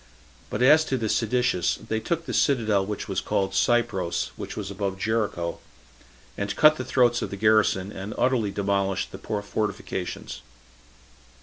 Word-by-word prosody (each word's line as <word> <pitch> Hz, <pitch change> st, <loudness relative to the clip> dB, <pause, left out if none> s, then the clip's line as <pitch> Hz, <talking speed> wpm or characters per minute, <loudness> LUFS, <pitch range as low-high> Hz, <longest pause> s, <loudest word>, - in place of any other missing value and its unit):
But -, -, -1 dB
as 150 Hz, +4 st, +7 dB
to 135 Hz, -, -1 dB
the 115 Hz, -3 st, -2 dB
seditious, 115 Hz, -5 st, +1 dB
they 110 Hz, -, -3 dB
took 165 Hz, +8 st, -2 dB
the -, -, -5 dB
citadel 110 Hz, -8 st, +2 dB
which 105 Hz, -1 st, -4 dB
was -, -, -1 dB
called 95 Hz, -1 st, -1 dB
Cypros, 100 Hz, -5 st, +1 dB
and -, -, -7 dB
was -, -, -5 dB
above 100 Hz, -1 st, -3 dB
Jericho, 105 Hz, -6 st, -1 dB, 0.8 s
and 100 Hz, 0 st, -3 dB
cut 155 Hz, 0 st, +6 dB
the 130 Hz, -, -3 dB
throats 120 Hz, -2 st, +2 dB
of -, -, -3 dB
the 100 Hz, -, -6 dB
garrison, 105 Hz, -2 st, +3 dB
and 100 Hz, +2 st, -6 dB
utterly 120 Hz, -4 st, +2 dB
demolished 100 Hz, -1 st, -1 dB
the -, -, -9 dB
fortifications. 105 Hz, -3 st, -4 dB
105 Hz, 150 wpm, -25 LUFS, 100-120 Hz, 0.8 s, as